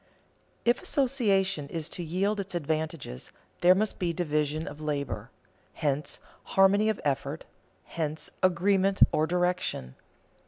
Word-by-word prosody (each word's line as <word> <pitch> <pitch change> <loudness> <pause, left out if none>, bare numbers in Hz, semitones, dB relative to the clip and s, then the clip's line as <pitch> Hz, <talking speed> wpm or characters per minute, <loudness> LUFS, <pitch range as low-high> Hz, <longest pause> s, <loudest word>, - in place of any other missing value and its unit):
If 240 +1 +3
association 200 - +1
is 160 -1 -3
to 175 - -5
yield 195 +6 0
its 190 -2 -4
advantages, 155 - -3 0.3
there 180 +1 +6
must 215 +2 -1
be 175 -2 0
division 155 -1 -1
of 150 - -8
labor; 145 -3 -3 0.4
hence 145 0 -1 0.4
harmony 200 +3 +5
of 215 - -1
effort, 140 +2 -1 0.4
hence 155 -2 -4
agreement 190 +2 +3
or 155 +1 +2
direction. 180 - -1
175 Hz, 120 wpm, -28 LUFS, 150-195 Hz, 0.4 s, there